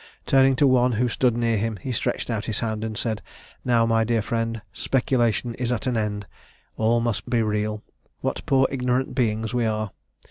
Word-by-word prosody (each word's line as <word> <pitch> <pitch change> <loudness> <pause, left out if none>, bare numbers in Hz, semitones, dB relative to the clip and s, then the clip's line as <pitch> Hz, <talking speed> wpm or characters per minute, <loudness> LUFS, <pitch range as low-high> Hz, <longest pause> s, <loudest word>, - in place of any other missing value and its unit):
Turning 135 0 +5
to 145 - +3
one 125 -2 +4
who 120 +3 +1
stood 120 0 +1
near 115 -1 +1
him, 110 0 -2
he 130 +8 -5
stretched 120 - -2
out 110 -2 -2
his 110 - -2
hand, 110 -2 -2
and 110 -1 -4
said, 110 -3 -1 0.4
'Now, 120 -2 +3
my 115 0 +3
dear 115 -1 +1
friend, 115 -1 -2
speculation 120 -2 +1
is 125 -1 -1
at 125 +1 -2
an 125 -2 0
end; 105 -2 -2 0.5
all 115 +2 +2
must 115 -3 -2
be 120 -2 +2
real! 105 0 -1 0.4
What - - -2
poor 135 -1 +4
ignorant 125 0 0
beings 110 -3 0
we 120 -2 +1
are!' 110 -2 -2
115 Hz, 190 wpm, -24 LUFS, 110-125 Hz, 0.5 s, Turning